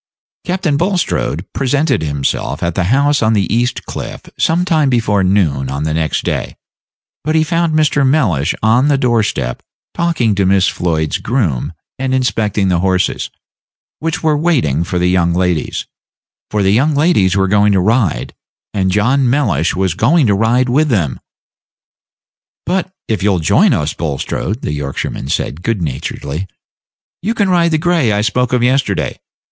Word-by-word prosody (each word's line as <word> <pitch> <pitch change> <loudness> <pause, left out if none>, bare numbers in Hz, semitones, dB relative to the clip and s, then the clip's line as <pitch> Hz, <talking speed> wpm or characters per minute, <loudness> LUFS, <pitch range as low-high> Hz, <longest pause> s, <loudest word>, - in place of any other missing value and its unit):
Captain 175 -5 0
Bulstrode 175 - -1
presented 140 -1 +1
himself 70 0 -2
at 85 0 0
the 90 +1 0
house 140 +7 +2
on 110 0 +2
the 100 -3 +2
East 120 +2 -1
Cliff - - -7
some 170 +2 +1
time 155 -5 +2
before 110 -5 +1
noon 80 -9 +1
on 70 +2 -3
the 80 0 -1
next 80 -1 -1
day, - - -3 0.7
but 155 +1 -1
he 160 - +4
found 165 0 0
Mr. 150 -2 +2
Mellish 110 - +1
on 120 +5 +3
the 145 -2 +3
door 120 -4 +2
step 65 - -3 0.3
talking 165 -11 +1
to 100 -1 +1
Miss 95 0 +3
Floyd's 80 +1 -1
groom 90 - -1 0.3
and 130 0 0
inspecting 105 -6 0
the 90 -2 +1
horses, 95 0 0 0.7
which 165 +2 -3
were 155 -1 +3
waiting 140 - +1
for 90 +1 -3
the 90 - +1
young 90 -2 +2
ladies; 90 -3 -1 0.6
for 105 -1 0
the 95 - +3
young 145 +7 +2
ladies 140 - +2
were 95 0 +2
going 105 +1 +3
to 95 - +3
ride, 110 -2 0 0.4
and 95 -2 0
John 120 +7 +2
Mellish 105 - +1
was 95 -2 0
going 135 - +3
to 105 - +3
ride 115 +5 +2
with 145 +6 +2
them. 95 - 0 1.5
"But 185 +1 -1 0.2
if 110 -3 -1
you'll 100 -1 +2
join 80 - +3
us, 75 +1 0
Bulstrode," 85 - -3
the 75 - -2
Yorkshireman 70 -2 -4
said, 70 +2 -2
good 115 +1 -1
naturedly, 70 +4 -4 0.7
"you 220 +6 -1
can 205 -3 +1
ride 170 -2 +3
the 160 - +1
gray 165 -7 +1
I 105 0 +1
spoke 125 +4 0
of 125 -1 +1
yesterday. 130 +2 0
110 Hz, 165 wpm, -15 LUFS, 90-145 Hz, 1.5 s, he